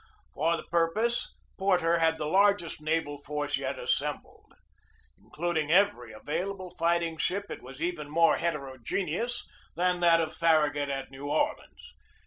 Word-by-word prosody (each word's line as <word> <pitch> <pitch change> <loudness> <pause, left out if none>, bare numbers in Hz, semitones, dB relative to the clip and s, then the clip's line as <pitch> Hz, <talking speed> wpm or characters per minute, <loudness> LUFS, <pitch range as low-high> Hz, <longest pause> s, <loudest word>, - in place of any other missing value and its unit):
For 165 +3 +1
the - - -7
purpose 175 +8 0 0.3
Porter 175 -3 +2
had 160 0 +2
the 155 - -3
largest 195 -1 +2
naval 155 -2 -1
force 145 0 -2
yet 135 0 -3
assembled. - - -3 0.7
Including 160 -2 -2
every 185 - +3
available 180 - -4
fighting 170 -1 0
ship, 200 +4 -2
it - - -6
was 135 +4 -8
even 170 -4 -3
more 165 +2 +4
heterogeneous 165 - -3 0.3
than 180 +1 +1
that 170 -1 +5
of 160 -1 -1
Farragut 150 -3 +2
at 135 -1 -4
New 140 +2 -7
Orleans. - - -2
165 Hz, 135 wpm, -29 LUFS, 145-175 Hz, 0.7 s, that